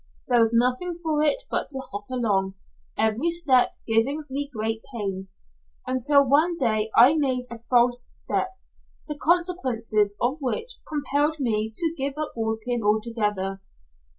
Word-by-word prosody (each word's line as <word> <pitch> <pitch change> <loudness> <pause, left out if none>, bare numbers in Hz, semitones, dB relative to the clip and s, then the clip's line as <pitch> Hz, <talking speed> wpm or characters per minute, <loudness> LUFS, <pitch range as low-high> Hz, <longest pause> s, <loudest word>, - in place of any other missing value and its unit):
There 245 -2 +3
was 225 -1 +4
nothing 250 +9 +1
for 310 -2 +1
it - - +2
but - - -1
to 270 - -2
hop 205 0 -5
along, 200 -6 0 0.4
every 220 +9 +1
step 305 -7 +4 0.2
giving 245 +7 +1
me 285 +1 -2
great 220 -1 -2
pain. 195 -5 -4 0.6
Until 275 +2 +3
one 315 +6 +3
day 220 -5 +1
I 255 +5 +7
made 260 -5 0
a 235 - -7
false 245 0 +2
step, 375 - -3 0.6
the 300 -2 -6
consequences 250 - +1
of 255 +5 0
which 460 - -3
compelled 295 +1 0
me 220 -4 -1
to 330 +3 0
give 275 -1 -2
up 305 0 -3
walking 225 +1 -2
altogether. 210 -3 -1
250 Hz, 145 wpm, -24 LUFS, 220-295 Hz, 0.6 s, I